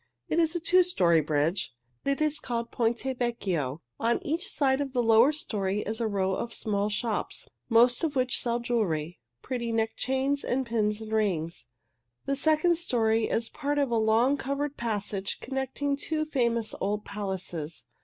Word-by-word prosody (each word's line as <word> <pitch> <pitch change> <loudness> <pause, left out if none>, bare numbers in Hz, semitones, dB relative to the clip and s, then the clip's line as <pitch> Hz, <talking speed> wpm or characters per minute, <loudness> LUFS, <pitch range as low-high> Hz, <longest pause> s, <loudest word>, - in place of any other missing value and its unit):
"It 330 - +2
is 325 0 +2
a - - +1
two 365 +3 +5
story 175 - +3
bridge. 150 0 0 0.3
It 275 +2 0
is 305 0 +1
called 235 -1 -3
Ponte 230 0 0 0.2
Vecchio. 175 - -1 0.2
On 235 +1 +2
each 335 +5 -1
side 270 -1 +1
of 275 -2 -4
the 245 -2 +2
lower 230 +4 +6
story 210 -9 -2
is 220 +2 -4
a 230 - +1
row 195 -2 0
of 235 +4 -3
small 205 -1 0
shops, 215 +1 -2 0.2
most 240 +4 +4
of 310 -3 0
which 255 -1 +2
sell 240 -1 0
jewelry 180 -10 -1 0.2
pretty 240 -3 -3
neck 225 0 +1
chains 265 +2 0
and 260 +1 0
pins 215 -2 0
and 220 0 -7
rings. 175 - -1 0.6
The 275 - 0
second 315 +4 +3
story 225 -8 +2
is 230 0 -1
part 290 +1 -2
of 280 -4 +1
a - - +2
long, 225 +5 +3
covered 280 +1 -2
passage 205 -3 -2
connecting 270 +2 -2
two 310 +2 -2
famous 235 -6 0
old 205 +1 -1
palaces. 180 - -4
235 Hz, 170 wpm, -28 LUFS, 205-275 Hz, 0.6 s, lower